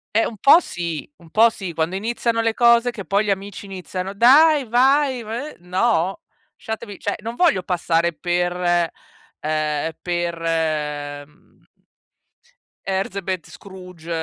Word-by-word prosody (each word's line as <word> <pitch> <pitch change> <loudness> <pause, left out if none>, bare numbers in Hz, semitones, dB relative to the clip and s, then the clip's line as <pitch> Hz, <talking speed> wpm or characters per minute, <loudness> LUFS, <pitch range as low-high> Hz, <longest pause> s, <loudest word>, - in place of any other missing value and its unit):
Eh, 225 - +4
un 220 - -6
po' 285 - +7
sì, 170 - -5
un 170 -2 -18
po' 225 +6 +5
sì, 190 -6 -7
quando 165 +4 -1
iniziano 230 +2 -1
le 225 -1 +1
cose 235 +1 +4
che 200 -5 -8
poi 200 +2 +1
gli 205 - -2
amici 195 0 -3
iniziano: 190 0 -6
"Dai, 280 +6 +6
vai, 260 +1 +3
v" 235 +8 -6
no, 185 0 0 0.3
lasciatevi, 220 -2 -7
cioè, - - -2
non 230 +1 -6
voglio 320 - +3
passare 170 -1 0
per 175 0 0 0.5
ehm, 155 0 -1
per, 175 -1 -2 0.9
mhmm 150 +3 -28 1.2
Herzebet 190 -2 -3
Scrooge, 180 -4 -12
195 Hz, 130 wpm, -21 LUFS, 175-230 Hz, 1.2 s, po